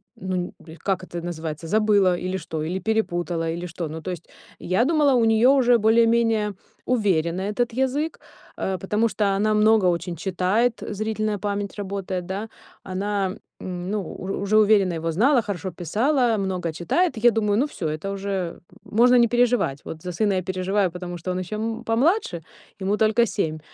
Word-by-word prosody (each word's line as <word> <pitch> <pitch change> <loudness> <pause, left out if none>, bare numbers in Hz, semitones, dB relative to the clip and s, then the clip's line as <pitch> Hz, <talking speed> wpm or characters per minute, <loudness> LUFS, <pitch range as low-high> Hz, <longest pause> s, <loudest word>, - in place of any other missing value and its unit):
ну 185 0 -4
нь 180 0 -3
бль 160 +1 -13
как 190 -2 -2
это 175 -1 -6
называется, 165 -2 -5
забыла 205 -3 +3
или 185 +1 -3
что, 160 -4 -5
или 180 +4 -2
перепутала, 175 -5 -1
или 175 +2 -4
что. 170 -1 -5
Ну 160 +1 -6
то 185 - -4
есть 170 -1 -8 0.3
я 190 +8 +1
думала, 300 -3 +3
у 230 -2 +3
неё 225 +4 +5
уже 245 -2 +5
более-менее 225 -1 +3 0.3
уверено 185 -7 +1
этот 225 +4 -1
язык, 265 +5 -1 0.4
э, 190 -1 -2
потому 210 +4 +1
что 200 0 0
она 215 +2 +2
много 215 -2 +4
очень 175 0 -1
читает, 190 +7 0
зрительная 215 0 -2
память 205 0 -3
работает, 195 -3 -4
да, 200 +4 -4 0.3
она, 195 +1 -2 0.3
м, 180 0 -5
ну 205 -5 -3
уж 190 - -7
уже 200 +2 +1
уверенно 205 -4 +4
его 165 0 -2
знала, 245 - +3
хорошо 190 -3 -4
писала, 230 - +1
много 185 -4 -2
читает. 315 - 0
Я 240 +2 +5
думаю: 210 -1 +1
"Ну 270 - +3
всё, 170 - -5
это 155 +6 -3
уже 195 -3 -3 0.2
можно 245 +3 +4
не 235 -1 +6
переживать". 240 - +2
Вот 160 0 -7
за 180 - -4
сына 205 +2 +1
я 185 -1 0
переживаю, 185 0 0
потому 175 0 -6
что 180 +2 -4
он 180 - -2
ещё, 185 +3 -5
м, 225 +2 -3
помладше, 240 - +1 0.4
ему 195 +2 0
только 220 +2 +3
7, 160 -7 -2
200 Hz, 180 wpm, -23 LUFS, 180-225 Hz, 0.4 s, не